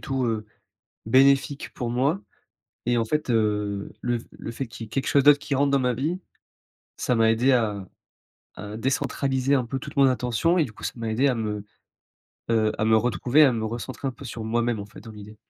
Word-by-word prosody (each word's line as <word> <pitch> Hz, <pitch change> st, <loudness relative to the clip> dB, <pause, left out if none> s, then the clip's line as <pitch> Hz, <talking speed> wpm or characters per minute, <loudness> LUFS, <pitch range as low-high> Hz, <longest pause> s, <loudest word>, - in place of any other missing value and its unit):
tout, 135 Hz, -1 st, -2 dB
heu, 110 Hz, -2 st, -2 dB, 0.6 s
bénéfique 135 Hz, +3 st, +3 dB
pour 120 Hz, -2 st, -3 dB
moi 135 Hz, +10 st, +1 dB, 0.7 s
et 120 Hz, 0 st, +2 dB
en 115 Hz, -, +1 dB
fait, 150 Hz, +3 st, -2 dB
heu, 105 Hz, -3 st, 0 dB
le 120 Hz, -1 st, -1 dB
f -, -, -13 dB
le -, -, -8 dB
fait 130 Hz, +2 st, -5 dB
qu'il 115 Hz, 0 st, -8 dB
y -, -, -14 dB
ait -, -, -23 dB
quelque 135 Hz, +3 st, -2 dB
chose 140 Hz, -, +3 dB
d'autre 145 Hz, 0 st, +7 dB
qui 140 Hz, -1 st, -3 dB
rentre 140 Hz, +1 st, +2 dB
dans 140 Hz, -, +3 dB
ma 125 Hz, -1 st, +1 dB
vie, 155 Hz, +9 st, -2 dB, 0.8 s
ça 125 Hz, -, 0 dB
m'a 115 Hz, -1 st, +4 dB
aidé 120 Hz, +4 st, +3 dB
à 105 Hz, -6 st, 0 dB, 0.7 s
à 105 Hz, +2 st, -7 dB
décentraliser 135 Hz, +2 st, 0 dB
un 130 Hz, -, 0 dB
peu 125 Hz, +3 st, -4 dB
toute -, -, -9 dB
mon 140 Hz, -1 st, +6 dB
attention 130 Hz, +7 st, +1 dB
et 160 Hz, -, +4 dB
du 120 Hz, -, -8 dB
coup -, -, -12 dB
ça -, -, -2 dB
m'a 115 Hz, -2 st, -4 dB
aidé 120 Hz, +6 st, +2 dB
à 135 Hz, -, +3 dB
me, 105 Hz, -3 st, -3 dB, 0.9 s
heu, 110 Hz, -1 st, +2 dB
à -, -, 0 dB
me 110 Hz, 0 st, +4 dB
retrouver, 125 Hz, -, +3 dB
à 130 Hz, -, +3 dB
me 110 Hz, -1 st, -2 dB
recentrer 120 Hz, +4 st, -5 dB
un -, -, -5 dB
peu 140 Hz, -, -12 dB
sur 115 Hz, -2 st, -6 dB
moi-même, 115 Hz, 0 st, 0 dB
en 100 Hz, -, -6 dB
fait, 105 Hz, -, -13 dB
dans 115 Hz, -, -10 dB
l'idée. 105 Hz, 0 st, -11 dB
120 Hz, 225 wpm, -25 LUFS, 110-135 Hz, 0.9 s, d'autre